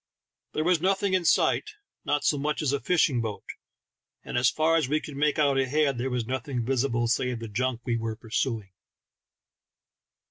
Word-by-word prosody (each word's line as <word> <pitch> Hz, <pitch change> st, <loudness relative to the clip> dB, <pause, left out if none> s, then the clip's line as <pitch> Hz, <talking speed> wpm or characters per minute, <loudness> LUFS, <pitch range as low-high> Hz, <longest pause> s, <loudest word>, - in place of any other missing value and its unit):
There 155 Hz, -, 0 dB
was 175 Hz, -1 st, +2 dB
nothing 195 Hz, +1 st, +1 dB
in 185 Hz, -2 st, +1 dB
sight, 430 Hz, -, +2 dB, 0.3 s
not 145 Hz, 0 st, 0 dB
so 145 Hz, -, +2 dB
much 150 Hz, +2 st, -1 dB
as 140 Hz, -2 st, +1 dB
a 140 Hz, -, 0 dB
fishing 135 Hz, -3 st, +2 dB
boat, 110 Hz, -3 st, -5 dB, 0.8 s
and -, -, -6 dB
as 120 Hz, -1 st, +4 dB
far 160 Hz, +1 st, +2 dB
as 155 Hz, -6 st, +1 dB
we 150 Hz, +2 st, +2 dB
could 150 Hz, -2 st, -9 dB
make 150 Hz, +1 st, +1 dB
out 140 Hz, -3 st, +3 dB
ahead, 135 Hz, 0 st, +1 dB
there 130 Hz, +2 st, -1 dB
was 125 Hz, -2 st, -2 dB
nothing 130 Hz, -1 st, -3 dB
visible 120 Hz, -2 st, 0 dB
save 125 Hz, +1 st, 0 dB
the 115 Hz, 0 st, -6 dB
junk 125 Hz, +3 st, -2 dB
we 120 Hz, -3 st, 0 dB
were 115 Hz, -1 st, -3 dB
pursuing. 110 Hz, -2 st, -3 dB
135 Hz, 180 wpm, -27 LUFS, 120-150 Hz, 0.8 s, as